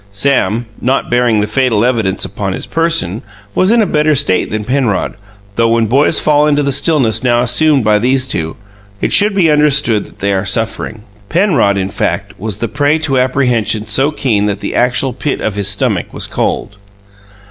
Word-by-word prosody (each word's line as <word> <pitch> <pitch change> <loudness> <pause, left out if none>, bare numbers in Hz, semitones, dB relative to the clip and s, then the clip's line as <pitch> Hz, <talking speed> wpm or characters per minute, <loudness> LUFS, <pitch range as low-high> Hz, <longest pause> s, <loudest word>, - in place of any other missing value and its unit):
Sam, 115 0 0 0.2
not 130 0 -1
bearing 120 -3 +2
the - - 0
fatal 115 -1 +1
evidence 110 -7 0
upon - - -4
his - - -5
person, 165 - 0 0.3
was 185 - +2
in 230 0 +4
a - - +1
better 155 -3 +1
state 130 -9 0
than 110 0 -3
Penrod, 120 -5 -1 0.4
though 115 0 +3
when 115 0 +2
boys 135 +7 +3
fall 150 0 +2
into 145 -1 +1
the 140 - 0
stillness 135 - +1
now 120 -1 +2
assumed 145 +2 +2
by 105 0 +3
these 130 +3 +1
two, 80 -9 -3 0.4
it - - -1
should 205 0 +3
be 170 -5 +3
understood 145 -7 +2
that - - -18
they 100 0 -1
are 95 0 0
suffering. 110 +1 -3 0.3
Penrod, 155 - +2
in 95 0 -2
fact, - - -3
was 105 0 -3
the 115 - -2
prey 145 +4 +1
to 145 -5 -1
apprehension 125 -4 0
so 135 +7 +1
keen 115 -9 0
that 100 -1 -2
the - - -5
actual 125 +1 +1
pit 140 +3 -3
of 110 - -2
his 100 -1 -2
stomach 100 - -1
was - - -3
cold. 100 - -3
125 Hz, 190 wpm, -13 LUFS, 105-145 Hz, 0.4 s, in